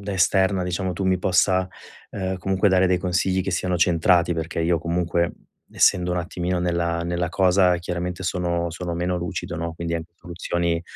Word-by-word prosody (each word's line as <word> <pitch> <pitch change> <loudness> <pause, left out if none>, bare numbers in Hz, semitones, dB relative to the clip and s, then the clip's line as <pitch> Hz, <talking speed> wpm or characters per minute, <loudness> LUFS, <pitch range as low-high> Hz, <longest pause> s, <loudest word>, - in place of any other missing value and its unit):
da 100 - -2
esterna 95 +1 +2 0.3
tu 95 +2 -4
mi 95 0 +2
possa, 95 0 +2 0.4
ehm, 95 -1 -3
comunque 95 +2 +1
dare 95 0 +4
dei 90 0 +2
consigli 95 +1 0
che 95 - -3
siano 90 0 -1
centrati, 85 +1 +3
perché 80 +1 -3
io 85 +1 +2
comunque, 85 +1 0 0.4
essendo 90 -2 +3
un - - -1
attimino 90 +1 -2
nella 85 -1 -1
nella 85 0 -1
cosa, 90 +1 +3
chiaramente 90 +1 -4
sono 85 -1 -1
sono 85 +1 -5
meno 90 +1 -1
lucido, 85 -1 -4
no, 85 0 -4
quindi 85 0 -3
anche 85 +1 -5
soluzioni 85 -1 -2
90 Hz, 170 wpm, -23 LUFS, 85-95 Hz, 0.4 s, dare